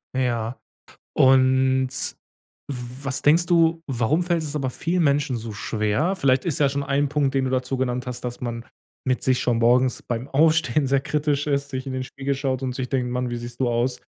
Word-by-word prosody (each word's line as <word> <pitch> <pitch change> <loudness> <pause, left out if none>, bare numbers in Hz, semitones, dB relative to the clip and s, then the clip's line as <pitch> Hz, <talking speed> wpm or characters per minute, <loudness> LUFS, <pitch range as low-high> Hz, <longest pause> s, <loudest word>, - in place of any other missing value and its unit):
Ja. 120 -2 -1 0.6
Und, 130 0 +4 0.8
w 125 0 -7
was 135 0 -2
denkst 165 +4 +4
du, 165 -1 +3
warum 135 +7 +1
fällt 170 -2 0
es 150 0 -5
aber 135 -3 -1
vielen 170 +7 -1
Menschen 140 -2 +1
so 110 0 -6
schwer? 110 - -1
Vielleicht 135 -7 +2
ist 165 -2 -1
ja 145 - +4
schon 140 +1 -2
ein 140 +1 0
Punkt, 140 -2 0
den 135 -1 +2
du 130 - -2
dazu 130 +1 -1
genannt 125 -1 -2
hast, 125 -1 -5
dass 125 -1 -6
man 115 -1 -4 0.4
mit 130 -1 +1
sich 130 -1 +2
schon 120 -3 +1
morgens 125 +2 +3
beim 120 +2 -4
Aufstehen 155 -2 +2
sehr 135 0 +3
kritisch 150 0 -1
ist, 140 -1 -1
sich 130 -1 -4
in 135 - -4
den 130 - -2
Spiegel 135 +2 -3
schaut 135 -1 -2
und 130 -1 -2
sich 130 -1 -4
denkt: 125 -2 -1
„Mann, 125 0 -1
wie 120 - -3
siehst 120 0 -8
du 130 -2 +1
aus?“ 120 +2 -1
130 Hz, 210 wpm, -23 LUFS, 125-145 Hz, 0.8 s, Und